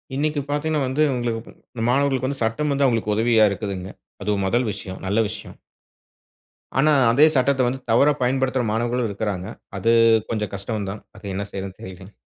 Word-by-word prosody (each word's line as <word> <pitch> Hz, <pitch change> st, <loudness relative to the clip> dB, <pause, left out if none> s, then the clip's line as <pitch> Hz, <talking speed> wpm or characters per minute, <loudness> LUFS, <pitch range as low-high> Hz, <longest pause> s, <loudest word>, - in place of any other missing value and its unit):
இன்னைக்கு 150 Hz, +1 st, 0 dB
பார்த்தீங்கன்னா 150 Hz, 0 st, 0 dB
வந்து, 130 Hz, +4 st, -1 dB
உங்களுக்கு 120 Hz, -2 st, -3 dB, 0.4 s
மாணவர்களுக்கு 135 Hz, 0 st, +1 dB
வந்து 140 Hz, -1 st, -4 dB
சட்டம் 135 Hz, +7 st, 0 dB
வந்து 140 Hz, 0 st, +2 dB
அவங்களுக்கு 115 Hz, -3 st, 0 dB
உதவியா 110 Hz, 0 st, +4 dB
இருக்குதுங்க. 95 Hz, -2 st, -4 dB, 0.3 s
அது 105 Hz, +1 st, 0 dB
மொதல் 120 Hz, +4 st, +1 dB
விஷயம், 95 Hz, -1 st, -7 dB
நல்ல 100 Hz, +4 st, +1 dB
விஷயம். 110 Hz, -, -8 dB, 1.2 s
ஆனா, 155 Hz, +3 st, +4 dB, 0.2 s
அதே 140 Hz, +6 st, +6 dB
சட்டத்த 130 Hz, 0 st, +2 dB
வந்து 130 Hz, +2 st, -2 dB
தவறா 140 Hz, +6 st, +5 dB
பயன்படுத்துற 130 Hz, 0 st, +1 dB
மாணவர்களும் 120 Hz, +2 st, 0 dB
இருக்குறாங்க. 100 Hz, -2 st, -3 dB, 0.3 s
அது 115 Hz, -, +2 dB, 0.4 s
கொஞ்சம் 105 Hz, -2 st, -2 dB
கஷ்டம் 100 Hz, 0 st, -4 dB
தான். 105 Hz, -, -8 dB
அது -, -, -13 dB
என்ன 100 Hz, +2 st, -2 dB
செய்றதுன்னு 95 Hz, -1 st, -6 dB
தெரியலங்க. 95 Hz, +2 st, -10 dB
115 Hz, 155 wpm, -22 LUFS, 105-135 Hz, 1.2 s, அதே